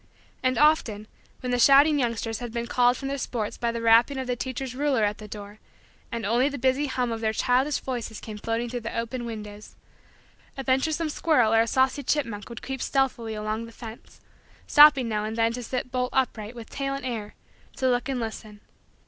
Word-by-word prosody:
And 255 -1 +1
often, 245 -8 +3 0.4
when 250 - -3
the 245 - +1
shouting 285 +3 +6
youngsters 230 -3 -2
had 240 -2 -6
been 235 0 -3
called 245 +1 +3
from 270 - -5
their 280 0 -3
sports 220 -5 -3
by 235 -1 -1
the 230 0 -4
rapping 230 +4 +5
of 260 - -3
the 250 0 -1
teacher's 260 +1 -4
ruler 270 -3 +1
at 210 0 0
the 215 - -9
door 205 0 -9 0.5
and 230 -3 -3
only 240 +6 +2
the 285 - -5
busy 265 +3 +1
hum 250 -3 -1
of 225 0 -4
their 220 -1 0
childish 260 +5 +2
voices 240 -4 -5
came 215 -1 -8
floating 230 +2 -2
through 245 +1 -4
the 230 0 -5
open 235 +1 -3
windows, 210 -2 -8 0.8
a 270 - -4
venturesome 305 +5 +1
squirrel 295 -8 +2
or 225 - +6
a 230 - +1
saucy 260 +3 +2
chipmunk 235 -8 -2
would 235 - -9
creep 265 -1 -5
stealthily 245 -5 0
along 215 +2 -3
the - - -12
fence, 230 0 -11 0.5
stopping 290 -4 +7
now 210 -2 -1
and 220 +1 -4
then 230 0 +2
to 245 - -5
sit 250 +1 -4
bolt 250 -1 -1
upright 235 -4 -1
with 230 -2 -10
tail 275 0 -2
in 275 - -6
air 220 -4 -4 0.4
to 260 - 0
look 245 +1 +1
and 265 -2 -1
listen. 220 -2 -6
240 Hz, 210 wpm, -26 LUFS, 225-265 Hz, 0.8 s, stopping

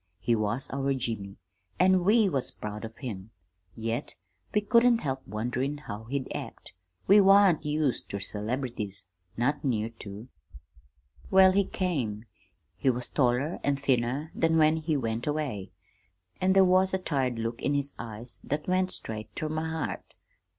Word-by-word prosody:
He 120 +5 +1
was 110 +4 -1
our 135 0 0
Jimmy, 110 -6 -4 0.4
an' 185 0 +4
we 210 +2 +5
was 140 -8 +1
proud 105 +1 -7
of 115 0 -10
him, 105 -6 -6 0.5
yet 115 +4 -3 0.4
we 210 - +2
couldn't 235 +2 +4
help 135 -2 -2
wonderin' 125 +7 -2
how 110 -5 -7
he'd 135 +2 -3
act. - - -8 0.3
We 205 +2 +7
wan't 195 -3 +6
used 150 -4 -1
ter 100 - -3
celebrities 105 -1 -3 0.3
not 125 +5 0
near 115 -5 0
to! 105 +3 -8 1.0
"Well, 190 0 +7
he 200 +1 +2
came. 125 - -2 0.5
He 115 +9 +1
was 125 -1 -1
taller 130 +4 +1
an' 140 - +2
thinner 135 +2 0
than 165 0 +2
when 155 0 +4
he 155 -1 0
went 115 -1 -2
away, 145 -10 -2 0.7
an' 185 +1 +4
there 190 0 +6
was 185 +1 +3
a - - +2
tired 135 -9 -1
look 115 +1 -3
in 145 - +1
his 140 0 -1
eyes 115 +1 -7
that 150 +2 -3
went 185 0 +2
straight 110 -9 -7
ter 155 - -3
my 155 +1 -2
heart. 160 -1 -4
135 Hz, 155 wpm, -28 LUFS, 115-160 Hz, 1.0 s, We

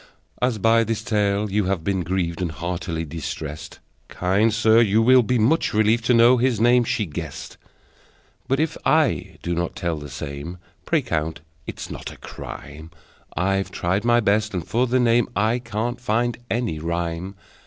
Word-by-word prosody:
As 125 -2 +1
by 115 +2 +4
this 110 -1 -3
tale 105 -2 0
you 105 0 +1
have 95 -3 -1
been 95 +1 0
grieved 90 -1 -2
And 85 -3 -1
heartily 85 0 -4
distressed, 75 -1 -6 0.3
Kind 100 +5 +1
sir, 110 +1 +4
you 110 -1 +3
will 125 +3 +6
be 125 +2 0
much 120 +3 +2
relieved 110 +2 +3
To 125 - +4
know 120 +2 +6
his 125 -3 +1
name 120 +1 +4
she 125 -4 -1
guessed: 75 - -7 0.9
But 135 +2 +1
if 160 0 0
I 105 - +1
do 85 - -1
not 85 0 -2
tell 85 -3 -2
the 75 -1 -8
same, 70 +6 -6 0.3
Pray 160 -4 +2
count 80 -5 -2 0.3
it - - -7
not - - -6
a - - -13
crime: 75 +2 -9 0.5
I've 95 +3 0
tried 95 +3 -1
my 120 0 +4
best, 105 -1 +1
and 85 -3 -3
for 120 +7 +1
that 130 +2 +2
name 120 0 +3
I 110 +4 +1
can't 120 +1 -3
find 120 +1 0
any 115 -9 -1
rhyme! 85 +3 -3
105 Hz, 175 wpm, -23 LUFS, 85-120 Hz, 0.9 s, will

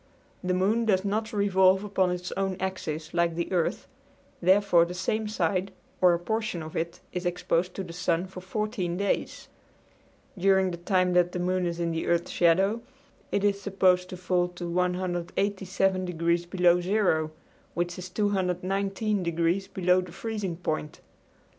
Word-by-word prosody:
The 180 0 0
moon 210 +5 +2
does 195 -3 +2
not 215 +2 -1
revolve 190 -2 +3
upon 195 -3 +1
its 180 0 -4
own 195 -1 -2
axis 160 -4 -4
like 170 -1 +1
the 170 +2 -3
earth, 175 -3 0 0.6
therefore 185 -1 +5
the 175 +1 -4
same 215 +4 -1
side 190 -1 -1 0.3
or 180 -2 +6
a - - -1
portion 220 -2 -2
of 155 - -9
it 170 +1 -3
is 180 0 -3
exposed 175 0 0
to 195 - -3
the 170 -2 -9
sun 175 0 0
for 185 -1 -9
14 190 -2 -2
days. 200 +1 -2 0.9
During 190 0 +3
the 170 - -5
time 180 +1 +1
that 175 0 +3
the 180 - -2
moon 180 0 0
is 170 0 -3
in 170 -1 0
the 165 0 -2
earth's 170 0 +1
shadow 190 +6 +3 0.5
it 200 - 0
is 200 -1 +1
supposed 185 -2 +2
to 185 - -7
fall 180 0 +1
to 175 0 -7
187 185 +2 0
degrees 170 0 0
below 180 -1 +3
zero, 180 -5 +1 0.5
which 175 +1 -2
is 185 +1 -7
219 195 +1 0
degrees 170 +3 0
below 185 0 +2
the 180 -1 -9
freezing 195 -2 -4
point. 155 -3 -3
185 Hz, 160 wpm, -27 LUFS, 175-195 Hz, 0.9 s, or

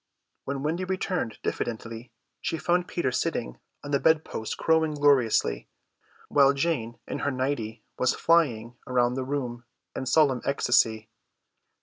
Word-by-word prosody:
When 140 0 -3
Wendy 165 +5 -1
returned 185 - -2
diffidently 115 0 -4 0.3
she 165 - -2
found 175 +2 +1
Peter 135 -7 -1
sitting 60 - -2 0.2
on 145 - -6
the 140 - +3
bed 160 +1 +3
post 110 - -5
crowing 160 -1 +2
gloriously, 135 - +2 0.6
while 140 -1 +5
Jane 140 -6 -1
in - - -4
her - - 0
nighty 125 -5 -3 0.2
was 130 - +2
flying 120 -9 +2
round 125 -1 +2
the 130 - -2
room 125 -3 -3 0.3
in 130 - -4
solemn 135 -3 +3
ecstasy. 110 -5 +2
135 Hz, 135 wpm, -27 LUFS, 120-155 Hz, 0.6 s, while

